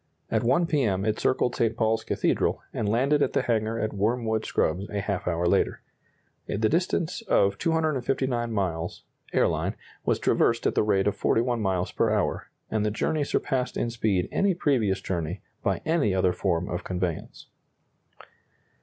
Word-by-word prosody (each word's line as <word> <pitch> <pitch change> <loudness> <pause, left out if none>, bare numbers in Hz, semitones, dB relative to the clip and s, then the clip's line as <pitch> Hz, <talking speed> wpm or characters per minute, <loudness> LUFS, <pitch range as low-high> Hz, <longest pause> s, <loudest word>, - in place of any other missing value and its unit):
At - - +1
1 170 +9 +3
P. 150 -3 +1
M. 100 -5 0
it 110 -1 0
circled 125 -1 +1
St. 115 -1 0
Paul's 110 -1 +1
Cathedral, - - 0
and 105 - -1
landed 135 +7 +2
at - - +1
the - - +1
hangar 110 -1 0
at 110 -1 -2
Wormwood 110 +2 0
Scrubbs 90 +6 0
a 105 - -2
half 100 -2 -3
hour 85 0 0
later. 85 - +1 0.6
The - - -2
distance 170 - 0
of 100 0 +3
259 135 -7 0
miles 90 -5 -2 0.3
(airline) - - +1 0.3
was - - +1
traversed 115 0 +2
at - - +2
the - - +2
rate 100 -2 +2
of 105 - +1
41 120 0 +1
miles 95 -3 0
per - - +1
hour, - - -1 0.2
and 110 -1 +1
the 105 - +1
journey 145 +8 0
surpassed 130 -2 -1
in 120 - -1
speed 105 -6 0
any 195 -2 +2
previous 125 - +1
journey 85 0 -3 0.2
by - - 0
any 155 - +2
other 90 -1 +2
form 90 -3 -1
of 90 - -4
conveyance. 90 -3 -4
110 Hz, 165 wpm, -26 LUFS, 95-130 Hz, 0.6 s, 1